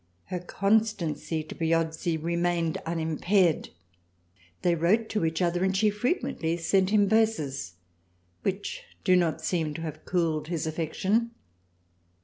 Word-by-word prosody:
Her 180 - -1
constancy 195 -4 0
to - - -9
Piozzi 165 0 0
remained 170 0 0
unimpaired. 165 +2 +1 0.9
They 175 - +4
wrote 190 +7 +2
to 210 -4 -1
each 160 +2 0
other 175 +1 +1
and 190 0 +1
she 210 +1 +3
frequently 210 - -1
sent 185 +3 +2
him 205 -1 +4
38 - - -2
THRALIANA 220 +1 +5
verses 140 - -5 0.7
which 195 +1 -3 0.2
do 185 -1 +5
not 170 -3 +1
seem 160 -4 -1
to 165 - -5
have 155 -1 -6
cooled 165 -4 0
his 165 -2 -2
affection. 185 +8 0
170 Hz, 135 wpm, -27 LUFS, 160-195 Hz, 0.9 s, THRALIANA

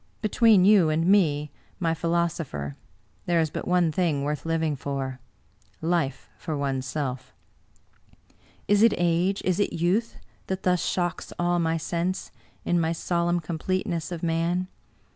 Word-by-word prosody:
Between 215 -3 +5
you 195 -6 +6
and 160 +2 +1
me, 150 -7 +3 0.3
my 165 -3 +1
philosopher, 165 - -2 0.5
there 170 -1 +3
is 160 -2 +1
but - - -5
one 180 -2 +3
thing 155 -4 0
worth 150 +2 -3
living 160 -2 0
for 135 -1 -4 0.3
— - - -30 0.2
^life 135 -4 -4
for 155 -3 -3
oneself." 130 -1 -3 1.3
Is 205 0 +4
it 230 -1 +5
age, 175 +3 +1
is 185 0 +1
it 205 - +1
youth, 185 +8 0 0.3
that 190 0 -3
thus 180 -1 +2
shocks 175 -2 -2
all 175 0 +1
my 165 -1 +1
sense, 170 +3 -2 0.3
in 175 - +2
my 160 0 +1
solemn 175 +1 0
completeness 170 0 -2
of 175 -1 -5
man? 170 +2 0
170 Hz, 145 wpm, -26 LUFS, 155-180 Hz, 1.3 s, you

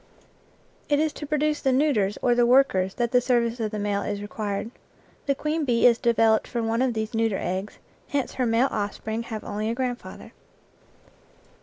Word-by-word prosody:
It 290 - +3
is 310 -1 +1
to 295 - -7
produce 300 0 0
the 265 - +2
neuters 255 -8 +2
or 245 - +4
the 240 0 +3
workers 215 -8 +3
that 235 -1 -1
the 250 - +4
service 240 -1 +1
of 220 -1 -1
the 215 - -5
male 205 -1 -1
is 205 -1 -3
required. 205 +1 -4 0.6
The 275 - +2
queen 305 +3 -1
bee 240 -4 +2
is 235 -1 +5
developed 225 -2 +3
from 235 -2 -2
one 230 +2 0
of 255 -3 +1
these 220 +2 -3
neuter 225 -3 +1
eggs, 190 +3 -4 0.3
hence 280 -3 -2
her 255 -2 0
male 230 +4 +2
offspring 220 +2 -3
have 225 -2 -6
only 210 +1 -3
a 230 - -1
grandfather. 250 -1 -5
235 Hz, 185 wpm, -25 LUFS, 215-260 Hz, 0.6 s, is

